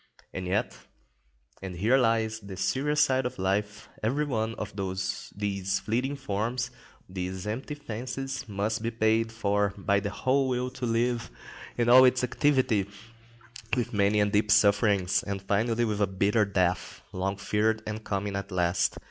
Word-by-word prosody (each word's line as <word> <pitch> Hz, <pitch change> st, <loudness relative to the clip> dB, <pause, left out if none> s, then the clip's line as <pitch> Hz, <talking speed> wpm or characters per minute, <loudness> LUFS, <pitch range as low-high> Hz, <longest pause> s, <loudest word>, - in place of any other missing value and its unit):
And 95 Hz, -1 st, -4 dB
yet, 95 Hz, +3 st, 0 dB, 0.9 s
and 95 Hz, -2 st, -6 dB
here 110 Hz, +9 st, +3 dB
lies 115 Hz, -3 st, +2 dB
the 100 Hz, -3 st, -9 dB
serious 145 Hz, +7 st, +1 dB
side 130 Hz, -3 st, +3 dB
of -, -, -9 dB
life, 105 Hz, +3 st, -1 dB
every 135 Hz, +8 st, 0 dB
one 115 Hz, -5 st, -2 dB
of 105 Hz, 0 st, -6 dB
these 95 Hz, +1 st, -2 dB
fleeting 125 Hz, +6 st, -1 dB
forms, 120 Hz, 0 st, -2 dB, 0.4 s
these 95 Hz, 0 st, -5 dB
empty 120 Hz, +7 st, -4 dB
fancies, 135 Hz, -1 st, -5 dB
must 105 Hz, +2 st, -1 dB
be 115 Hz, -, -1 dB
paid 115 Hz, 0 st, +1 dB
for 100 Hz, -2 st, 0 dB
by 100 Hz, 0 st, +2 dB
the 100 Hz, 0 st, -3 dB
whole 130 Hz, +7 st, +1 dB
will 125 Hz, 0 st, -1 dB
to 125 Hz, -1 st, -4 dB
live, 120 Hz, +1 st, 0 dB, 0.5 s
in 120 Hz, -1 st, +1 dB
all 125 Hz, +2 st, +9 dB
its 125 Hz, 0 st, +4 dB
activity, 125 Hz, -6 st, +2 dB, 0.9 s
with 120 Hz, 0 st, -1 dB
many 100 Hz, 0 st, +3 dB
and 105 Hz, 0 st, +2 dB
deep 105 Hz, 0 st, +2 dB
sufferings, 100 Hz, -2 st, +4 dB
and 100 Hz, -1 st, -5 dB
finally 115 Hz, +4 st, +1 dB
with 105 Hz, -2 st, -2 dB
a 100 Hz, -, +3 dB
bitter 100 Hz, +3 st, +2 dB
death, 95 Hz, -3 st, -1 dB
long 95 Hz, +2 st, -2 dB
feared 105 Hz, +2 st, 0 dB
and 105 Hz, +1 st, -5 dB
coming 100 Hz, 0 st, -2 dB
at 100 Hz, 0 st, -4 dB
last. 90 Hz, 0 st, +1 dB
105 Hz, 155 wpm, -28 LUFS, 100-120 Hz, 0.9 s, all